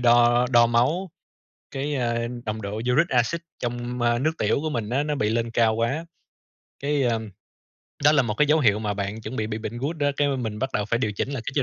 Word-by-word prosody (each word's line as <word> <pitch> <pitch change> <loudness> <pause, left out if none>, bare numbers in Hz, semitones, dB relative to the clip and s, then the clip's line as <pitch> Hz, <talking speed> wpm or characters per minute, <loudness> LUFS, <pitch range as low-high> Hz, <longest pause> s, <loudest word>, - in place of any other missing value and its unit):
đo 120 0 +5
đo 120 -2 +6
máu, 145 +11 +1 0.6
cái, 145 +2 -2
a, 115 -2 -1 0.2
nồng 110 +1 -3
độ 100 0 -4
uric 125 +9 +2
acid 125 +7 +1 0.2
trong 120 0 -3 0.3
nước 155 - +3
tiểu 110 +6 +1
của 155 - -2
mình 115 -7 -3
á 135 +4 +1
nó 150 -1 -1
bị 105 -5 0
lên 115 +1 -1
cao 115 -1 +3
quá, 125 +9 -1 0.8
cái, 145 0 +1
ơ, 120 -3 +2 0.9
đó 150 - +7
là 145 - +4
một 110 -4 -2
cái 150 - +3
dấu 155 +2 +4
hiệu 105 -6 +3
mà 105 -2 -2
bạn 100 +2 -4
chuẩn 125 - -6
bị 110 - -1
bị 110 0 -4
bệnh 115 +1 -5
gout 145 +6 -2
đó. 145 -2 +1
Cái 145 -1 +2
mà 140 - 0
mình 110 -4 -4
bắt 130 +2 -2
đầu 105 - 0
phải 115 +2 0
điều 105 -3 -1
chỉnh 100 - -2
cái 130 -5 -4
chế 140 - +2
120 Hz, 240 wpm, -24 LUFS, 110-140 Hz, 0.9 s, đó